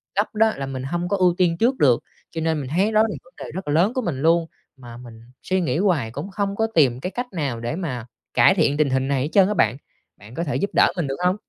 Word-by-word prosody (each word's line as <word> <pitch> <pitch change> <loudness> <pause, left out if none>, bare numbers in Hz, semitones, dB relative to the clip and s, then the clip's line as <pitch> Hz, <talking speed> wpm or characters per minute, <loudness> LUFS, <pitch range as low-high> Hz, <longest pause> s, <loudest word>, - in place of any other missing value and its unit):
gấp 205 +2 -1
đó 220 0 +4
là 135 - -3
mình 130 -1 -5
hông 175 +5 -3
có 200 - +1
ưu 180 -2 +3
tiên 170 -2 +2
trước 250 +6 +2
được. 125 -5 +3 0.3
Cho 165 - -4
nên 160 -1 0
mình 130 - -6
thấy 190 +8 +1
đó 215 0 +4
là 220 - +2
vấn 175 - -23
đề - - -8
rất 190 -4 -6
là 145 - 0
lớn 185 +9 +3
của 255 - -1
mình 145 - -3
luôn, 165 +1 +3 0.3
mà 120 -2 -11
mình 115 -2 -12 0.2
suy 185 0 0
nghĩ 160 -1 -1
hoài 165 - +1
cũng 195 - -6
không 200 0 -2
có 225 +1 +1
tìm 130 -6 +3
cái 185 +7 -4
cách 245 0 -4
nào 140 -8 -2
để 120 +7 -3
mà 130 -11 -4 0.3
cải 190 - +5
thiện 150 -4 +2
tình 150 -3 +2
hình 130 0 0
này 140 -2 0
hết 150 - -3
trơn 195 -2 +6
á 210 - 0
bạn. 115 - +2 0.4
Bạn 105 +4 -14
có 170 - -2
thể 145 - -3
giúp 200 - -1
đỡ - - +5
mình 160 -5 -1
được 135 - -3
hông? 180 +2 +3
165 Hz, 285 wpm, -22 LUFS, 135-195 Hz, 0.4 s, trơn